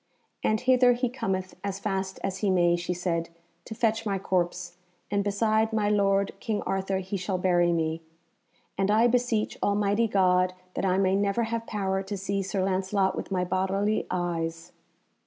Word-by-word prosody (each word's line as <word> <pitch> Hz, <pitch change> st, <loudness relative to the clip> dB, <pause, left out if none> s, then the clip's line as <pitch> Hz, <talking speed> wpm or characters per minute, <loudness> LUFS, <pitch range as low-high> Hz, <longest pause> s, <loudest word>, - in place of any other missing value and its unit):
"And 215 Hz, 0 st, +1 dB
hither 255 Hz, -1 st, +5 dB
he 245 Hz, 0 st, -1 dB
cometh 190 Hz, -7 st, -3 dB
as 200 Hz, -1 st, -3 dB
fast 195 Hz, -1 st, -3 dB
as 190 Hz, -1 st, -2 dB
he 205 Hz, -, +1 dB
may," 175 Hz, -2 st, +3 dB
she 175 Hz, +1 st, -3 dB
said, 170 Hz, -2 st, -2 dB, 0.4 s
"to 220 Hz, -, -7 dB
fetch 225 Hz, 0 st, +1 dB
my 200 Hz, -3 st, -1 dB
corpse, 180 Hz, -1 st, -1 dB, 0.4 s
and 200 Hz, -1 st, +1 dB
beside 215 Hz, +2 st, +1 dB
my 215 Hz, -2 st, +1 dB
lord 200 Hz, -1 st, +2 dB
King 215 Hz, -2 st, -2 dB
Arthur 195 Hz, 0 st, -1 dB
he 190 Hz, +1 st, -3 dB
shall 185 Hz, 0 st, -2 dB
bury 175 Hz, -1 st, +3 dB
me. 160 Hz, -1 st, -1 dB, 0.8 s
And 195 Hz, 0 st, +2 dB
I 220 Hz, +3 st, +4 dB
beseech 240 Hz, -3 st, +1 dB
Almighty 205 Hz, +2 st, +2 dB
God 185 Hz, -2 st, +2 dB, 0.2 s
that -, -, -2 dB
I 185 Hz, 0 st, +2 dB
may 190 Hz, 0 st, +2 dB
never 200 Hz, +3 st, +1 dB
have 230 Hz, 0 st, -3 dB
power 195 Hz, -2 st, -1 dB
to 195 Hz, +1 st, -5 dB
see 195 Hz, +1 st, -2 dB
Sir 195 Hz, 0 st, -2 dB
Lancelot 190 Hz, +1 st, +1 dB
with -, -, -5 dB
my 185 Hz, -2 st, 0 dB
bodily 195 Hz, +3 st, 0 dB
eyes." 165 Hz, -2 st, -3 dB
195 Hz, 175 wpm, -27 LUFS, 185-210 Hz, 0.8 s, hither